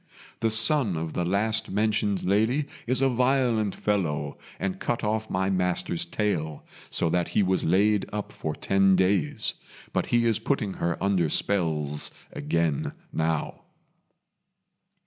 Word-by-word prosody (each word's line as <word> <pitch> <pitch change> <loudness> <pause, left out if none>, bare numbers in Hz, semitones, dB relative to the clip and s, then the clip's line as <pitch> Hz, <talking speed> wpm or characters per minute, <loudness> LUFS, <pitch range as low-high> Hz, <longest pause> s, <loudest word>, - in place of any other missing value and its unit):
The 115 - +1
son 115 - +3
of 80 0 -4
the 90 - -1
last 100 +5 0
mentioned 105 -1 0
lady 110 +9 +2 0.2
is 130 +2 +3
a - - +5
violent 125 -4 +1
fellow, 95 -8 -1 0.2
and 95 -1 -2
cut 120 -1 -2
off 110 +1 -1
my 95 +1 0
master's 90 -2 0
tail, 85 -6 -2 0.2
so - - 0
that 90 -1 +1
he 105 - +5
was 95 0 +1
laid 100 +4 +3
up 105 -1 -4
for 80 -7 -4
ten 95 -1 +3
days. 95 -5 +1 0.4
But - - 0
he 120 0 +2
is 115 -1 +2
putting 110 -4 -1
her 85 0 0
under 95 -5 +2
spells 75 -6 0 0.2
again 85 -4 -1 0.2
now." 80 -1 -1
100 Hz, 140 wpm, -26 LUFS, 85-110 Hz, 0.4 s, a